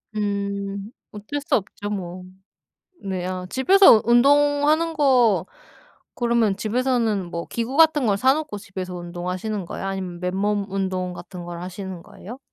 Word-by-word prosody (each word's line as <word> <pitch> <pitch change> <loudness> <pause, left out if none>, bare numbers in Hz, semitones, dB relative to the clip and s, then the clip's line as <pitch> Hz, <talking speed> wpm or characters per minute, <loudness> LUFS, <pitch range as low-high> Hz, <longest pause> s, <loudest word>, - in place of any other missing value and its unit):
음. 200 0 -3 0.2
어쩔 215 +8 -5
수 - - +1
없죠 205 0 -4
뭐. 185 -2 -5 0.8
네 185 -2 -3
아 185 0 -4
집에서 320 - +6
운동하는 290 +6 +4
거 255 -9 +3 0.7
그러면 235 -4 +1
집에서는 225 -2 0
뭐 170 0 -4
기구 235 +3 -3
같은 315 -5 +5
걸 200 -1 +2
사 260 +5 +4
놓고 300 -7 -4
집에서 185 -2 -7
운동하시는 180 +3 -4
거예요? 190 - -6
아니면 185 -3 -5
맨몸 200 +3 -1
운동 185 -2 -2
같은 180 0 -9
걸 175 -1 -7
하시는 185 -1 -7
거예요? 205 +5 -11
205 Hz, 285 characters per minute, -23 LUFS, 185-245 Hz, 0.8 s, 집에서